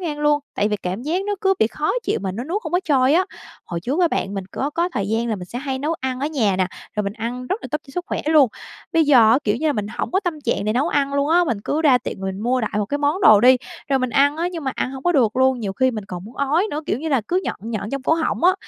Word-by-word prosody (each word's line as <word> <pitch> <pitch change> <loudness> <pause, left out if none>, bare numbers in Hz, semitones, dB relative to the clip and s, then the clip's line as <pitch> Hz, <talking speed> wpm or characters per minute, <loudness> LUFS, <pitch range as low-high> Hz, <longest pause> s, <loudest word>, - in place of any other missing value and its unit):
ngang 305 -5 -4
luôn, 295 0 +3
tại 205 - +1
vì 210 - 0
cảm 190 +4 -4
giác 340 +6 -1
nó 410 - 0
cứ 385 0 +3
bị 220 - +4
khó 300 +7 -2
chịu - - -1
mà 190 -2 -2
nó 235 +5 -5
nuốt 370 +9 -3
hông - - -6
có 360 - +3
trôi 270 -2 +3
á. 370 +2 +4 0.4
Hồi 170 -1 -5
trước 275 - -1
á 345 - +4
bạn, 200 -8 -2
mình 195 - -4
có 280 +2 -2
có 340 +3 0
thời 200 -1 -2
gian 225 +2 0
là 215 - -1
mình 180 - -7
sẽ 235 +7 -6
hay 265 -1 -3
nấu 300 +4 -1
ăn 260 0 -3
ở 285 - 0
nhà 225 -11 +1
nè, 185 - +2 0.3
rồi 210 - +1
mình 200 - -2
ăn 240 +3 -5
rất 395 - -3
là - - -6
tốt 300 - 0
cho - - -13
sức 355 0 -2
khỏe - - -2
luôn, 305 -5 +5 0.4
bây 325 -1 +4
giờ 245 -7 +6
á, 245 - +5
kiểu 210 +1 +1
như 315 - -2
là, 300 - +3
mình 210 -5 -3
hổng 215 - -4
có 380 - +2
tâm 330 -5 -3
trạng 220 -3 0
để 215 - +1
nấu 270 +8 +1
ăn 280 0 0
luôn 280 +1 +1
á, 350 +2 +4
mình 235 -9 -1
cứ 315 +2 -1
ra 270 -5 +5
tiệm 245 - -5
mà - - -5
mình 190 +1 -4
mua 250 +3 +1
đại 220 - -2
một 210 - 0
cái 285 +6 -2
món 295 +6 0
đồ 215 - +7
đi, 255 +1 +7 0.3
rồi 270 - +2
mình 255 -1 -1
ăn 285 +4 +3
á, 340 +2 -1
nhưng 325 -4 -6
mà 265 - -1
ăn 255 - -2
hông 265 0 -8
có 350 - +2
được 240 -7 +2
luôn, 260 -1 +3
nhiều 200 -3 -3
khi 260 +5 +2
mình 215 -4 -5
còn 180 -2 -7
muốn 225 +4 -12
ói 300 +8 +1
nữa, 300 - -3
kiểu 220 - 0
như 320 +3 -4
là, 270 -5 +2
cứ 365 +2 +1
nhợn - - -2 0.2
nhợn 210 -1 -4
trong 275 -1 -3
cổ 320 - +3
họng 325 +1 -1
á. 370 - +6
265 Hz, 330 wpm, -21 LUFS, 220-310 Hz, 0.4 s, đồ